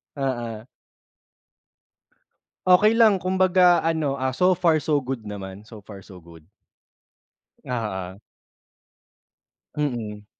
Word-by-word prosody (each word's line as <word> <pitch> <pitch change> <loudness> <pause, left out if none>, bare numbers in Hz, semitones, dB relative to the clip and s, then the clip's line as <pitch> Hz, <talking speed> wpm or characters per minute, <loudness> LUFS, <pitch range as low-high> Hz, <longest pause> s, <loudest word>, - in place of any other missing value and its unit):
Oo. 120 -5 -4 2.0
Okey 210 +5 +5
lang, 215 -5 +4
kumbaga 185 -1 +3
ano, 155 -4 -1
ah, 130 0 -2
so 180 +5 +2
far, 165 -4 +2
so 150 +1 +1
good 130 -3 -4
naman. 100 -2 -8
So 110 -1 -14
far, 100 -2 -11
so 95 0 -14
good. 85 -1 -17 1.1
Oo. 100 -6 -5 1.6
Mm. 110 -8 -4
130 Hz, 100 wpm, -23 LUFS, -, 2.0 s, Okey